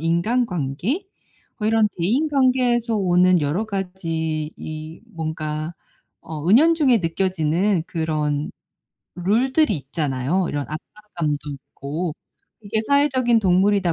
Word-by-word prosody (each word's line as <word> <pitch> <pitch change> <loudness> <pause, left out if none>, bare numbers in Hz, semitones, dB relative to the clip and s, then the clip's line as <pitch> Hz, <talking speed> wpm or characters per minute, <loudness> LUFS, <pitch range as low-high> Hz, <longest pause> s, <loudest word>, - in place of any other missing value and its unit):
인간관계 180 - 0 0.5
뭐 215 - 0
이런 225 -1 +4
대인 245 - +1
관계에서 250 -4 +2
오는 180 -2 +4
여러 170 +10 0
가지 165 -6 -3
이 155 +3 -8
뭔가 155 0 -4 0.5
어 160 +1 -5
은연중에 280 - +5
느껴지는 180 +1 +1
그런 155 -3 -1 0.6
룰들이 220 - +2
있잖아요, 140 +4 -1
이런 145 -1 -3
압박감도 155 -4 -4
있고. 145 +4 -5 0.5
이게 210 +2 -1
사회적인 260 -3 +3
동물이다 190 -1 +3
180 Hz, 250 characters per minute, -22 LUFS, 155-225 Hz, 0.6 s, 은연중에